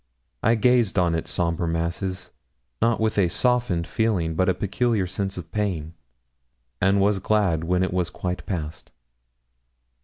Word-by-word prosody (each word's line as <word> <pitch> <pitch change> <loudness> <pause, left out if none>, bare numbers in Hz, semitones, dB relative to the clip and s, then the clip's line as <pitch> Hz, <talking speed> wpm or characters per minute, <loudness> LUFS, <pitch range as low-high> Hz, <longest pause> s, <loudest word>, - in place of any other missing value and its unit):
I 115 - +3
gazed 120 -3 +3
on 90 -2 +3
its 80 - -2
sombre 85 -1 -1
masses 85 +3 -3 0.5
not 115 0 +2
with 110 -1 +1
a 95 - +4
softened 120 -3 +1
feeling, 95 -8 0
but 95 +3 +2
a 95 - +2
peculiar 110 0 0
sense 95 +1 -3
of 80 -3 -8
pain, 90 -6 -2 0.9
and 100 +1 +3
was 100 0 +2
glad 95 -6 +1
when 90 +2 +1
it 95 - -1
was 90 -1 0
quite 90 0 -4
past. 80 -4 -5
95 Hz, 150 wpm, -24 LUFS, 85-105 Hz, 0.9 s, a